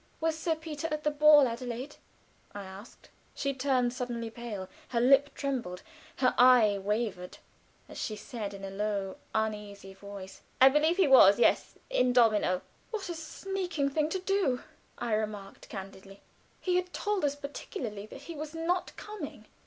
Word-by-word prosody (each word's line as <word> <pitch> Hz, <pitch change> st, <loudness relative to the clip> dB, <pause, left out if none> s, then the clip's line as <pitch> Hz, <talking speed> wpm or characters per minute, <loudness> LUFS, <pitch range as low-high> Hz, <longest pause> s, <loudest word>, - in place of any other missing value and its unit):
"Was 325 Hz, 0 st, 0 dB
Sir 325 Hz, 0 st, -1 dB
Peter 315 Hz, -1 st, -5 dB
at 305 Hz, 0 st, -2 dB
the 300 Hz, -, +2 dB
ball, 295 Hz, -2 st, +7 dB
Adelaide?" 245 Hz, +3 st, -5 dB, 0.6 s
I 205 Hz, -, -5 dB
asked. 195 Hz, +5 st, -12 dB, 0.2 s
She 275 Hz, -1 st, -1 dB
turned 255 Hz, -2 st, +1 dB
suddenly 240 Hz, -3 st, -4 dB
pale; 220 Hz, -5 st, -6 dB, 0.2 s
her 235 Hz, -, -1 dB
lip 275 Hz, +4 st, +4 dB
trembled; 250 Hz, -11 st, -3 dB, 0.3 s
her 255 Hz, -1 st, +2 dB
eye 240 Hz, -5 st, +6 dB
wavered, 205 Hz, -3 st, -2 dB, 0.5 s
as -, -, -9 dB
she 215 Hz, -, -3 dB
said 210 Hz, -2 st, -6 dB
in 195 Hz, 0 st, -7 dB
a 195 Hz, -, -6 dB
low, 200 Hz, -1 st, -2 dB, 0.2 s
uneasy 210 Hz, -3 st, -3 dB
voice: 195 Hz, -1 st, -10 dB, 0.2 s
"I 265 Hz, -, +9 dB
believe 310 Hz, +5 st, +2 dB
he 380 Hz, -5 st, +4 dB
was 205 Hz, -7 st, +8 dB
yes; 240 Hz, -, +2 dB, 0.2 s
in 250 Hz, -, +3 dB
domino." 215 Hz, -6 st, +3 dB, 0.3 s
"What 420 Hz, -5 st, -4 dB
a -, -, -2 dB
sneaking 335 Hz, -2 st, -3 dB
thing 305 Hz, +1 st, +1 dB
to 380 Hz, -, -2 dB
do!" 370 Hz, -9 st, 0 dB, 0.3 s
I 230 Hz, -, -2 dB
remarked, 210 Hz, -2 st, -4 dB
candidly. 195 Hz, 0 st, -9 dB, 0.4 s
"He 360 Hz, -1 st, +1 dB
had 360 Hz, 0 st, -2 dB
told 415 Hz, -4 st, -1 dB
us 285 Hz, -1 st, +1 dB
particularly 240 Hz, -7 st, -6 dB
that 270 Hz, -, -11 dB
he 335 Hz, +4 st, -8 dB
was 310 Hz, +1 st, -7 dB
not 345 Hz, +3 st, -1 dB
coming." 325 Hz, -, -8 dB
250 Hz, 160 wpm, -30 LUFS, 210-305 Hz, 0.6 s, I